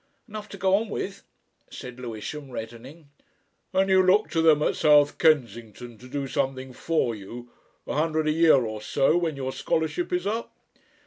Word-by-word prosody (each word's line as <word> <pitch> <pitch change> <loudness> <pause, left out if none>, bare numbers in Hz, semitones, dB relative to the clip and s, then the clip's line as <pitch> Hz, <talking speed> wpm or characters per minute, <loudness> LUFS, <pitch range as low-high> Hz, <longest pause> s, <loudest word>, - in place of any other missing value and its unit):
"Enough 215 -1 -8
to 200 - -9
go 190 0 +1
on 220 +1 -3
with," 200 -1 -5 0.5
said 125 0 -9
Lewisham, 125 +4 -7
reddening. 125 +6 -9 0.6
"And 190 0 +2
you 190 -1 +5
look 195 +4 +3
to 165 - +1
them 155 -2 +4
at - - +1
South 145 -1 +4
Kensington, 120 - 0
to 125 - -13
do 140 +2 -4
something 130 -2 -3
for 155 -5 -1
you 120 +4 -10 0.3
a - - -4
hundred 155 0 0
a - - +3
year 160 0 +5
or 110 -1 -5
so, 140 +7 +2
when 170 -3 0
your 130 -1 -4
scholarship 160 +4 -2
is 180 +1 -1
up?" 225 +3 -3
150 Hz, 175 wpm, -25 LUFS, 125-175 Hz, 0.6 s, you